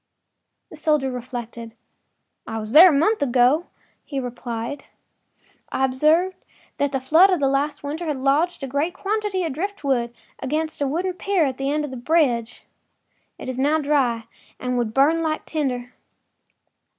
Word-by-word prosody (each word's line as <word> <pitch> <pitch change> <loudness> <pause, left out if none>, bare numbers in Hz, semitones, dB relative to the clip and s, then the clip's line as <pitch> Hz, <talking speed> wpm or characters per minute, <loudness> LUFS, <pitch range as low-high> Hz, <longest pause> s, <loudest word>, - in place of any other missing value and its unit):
” - - -55
The - - -10
soldier 300 -4 +1
reflected. 240 -2 -7 0.7
“I 225 - -4
was 215 0 -4
there 330 +7 +9
a - - +3
month 330 +10 +2
ago,” 260 +5 +3 0.4
he 275 - -4
replied. 245 +1 -5 0.9
“I 265 - +1
observed 315 +8 +2 0.4
that 285 -1 0
the 270 - -1
flood 320 +9 +5
of 365 -3 +2
last 275 +2 0
winter 310 +4 -4
had 300 -3 -1
lodged 280 +5 +1
a - - -2
great 290 +7 -1
quantity 410 -2 -1
of 320 -5 -2
driftwood 280 -9 -2 0.3
against 310 +4 -2
the 285 - 0
wooden 355 +6 -1
pier 375 -2 +1
at 265 -1 -3
this 270 - -1
end 300 0 0
of 285 - -8
the 260 - -6
bridge. 245 -5 0 0.7
It - - -9
is 255 0 -4
now 295 +4 +3
dry 275 -6 +1 0.4
and 250 0 -2
would 240 -3 -1
burn 290 +7 +3
like 310 -1 -2
tinder. 255 -5 -3
280 Hz, 160 wpm, -22 LUFS, 250-320 Hz, 0.9 s, there